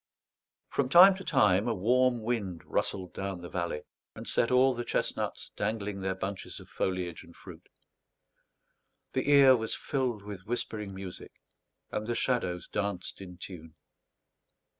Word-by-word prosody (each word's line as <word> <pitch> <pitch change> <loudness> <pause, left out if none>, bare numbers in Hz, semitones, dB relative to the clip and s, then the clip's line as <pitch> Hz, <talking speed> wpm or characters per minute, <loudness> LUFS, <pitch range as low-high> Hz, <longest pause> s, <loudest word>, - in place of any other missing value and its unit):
From 135 -2 0
time 185 +6 +9
to 190 +1 -8
time 105 - +3
a 115 - +1
warm 120 +4 +2
wind 105 -7 -2
rustled 95 -2 -2
down 95 -2 -4
the 85 - -8
valley, 85 -4 -2 0.3
and - - -8
set 115 - +2
all 130 +1 +5
the 120 0 -4
chestnuts - - -2
dangling 105 -1 -2
their 95 0 -1
bunches 95 +1 -5
of - - -14
foliage 90 -3 -2
and - - -16
fruit; - - -13 1.4
the - - 0
ear 140 -2 +8
was 110 -2 -2
filled 125 -7 -2
with 100 -2 -8
whispering 105 -4 -3
music, 95 -1 -8 0.6
and 105 0 -3
the 120 - -1
shadows 95 -10 0
danced 100 -2 -3
in 90 -2 -9
tune. 80 -3 -9
105 Hz, 145 wpm, -30 LUFS, 95-125 Hz, 1.4 s, time